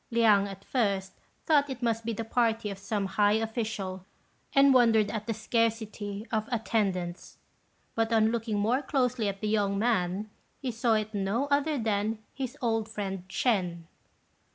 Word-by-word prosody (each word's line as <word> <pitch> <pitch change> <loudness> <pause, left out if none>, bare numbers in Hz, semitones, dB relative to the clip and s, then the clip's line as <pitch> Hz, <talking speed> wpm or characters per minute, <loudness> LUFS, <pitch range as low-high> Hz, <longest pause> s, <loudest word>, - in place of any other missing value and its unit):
Liang, 215 -4 +4
at 195 0 -10
first, 200 -6 0 0.3
thought 290 -2 +3
it 260 -2 -6
must 230 -1 0
be 230 - -1
the 225 +1 -3
party 225 -2 +1
of 195 - -7
some 200 0 -2
high 205 +1 +2
official, 220 -4 -2 0.5
and 275 -1 +6
wondered 225 -4 +4
at 215 -1 -4
the 225 - 0
scarcity 220 -2 -1
of 220 0 -1
attendants; 195 -6 -1 0.6
but, 225 0 0
on 220 -1 +4
looking 225 -2 -1
more 230 +6 +2
closely 250 -5 0
at 195 0 -6
the 215 - -1
young 205 -2 +1
man, 205 -2 0 0.3
he 260 -3 -3
saw 230 0 +2
it 215 0 -1
was 200 - -1
no 225 +8 0
other 290 +1 +2
than 215 -1 0 0.2
his 265 0 -5
old 225 -2 0
friend 195 -4 -4
Ch'ên. 180 -9 0
220 Hz, 165 wpm, -29 LUFS, 200-235 Hz, 0.6 s, and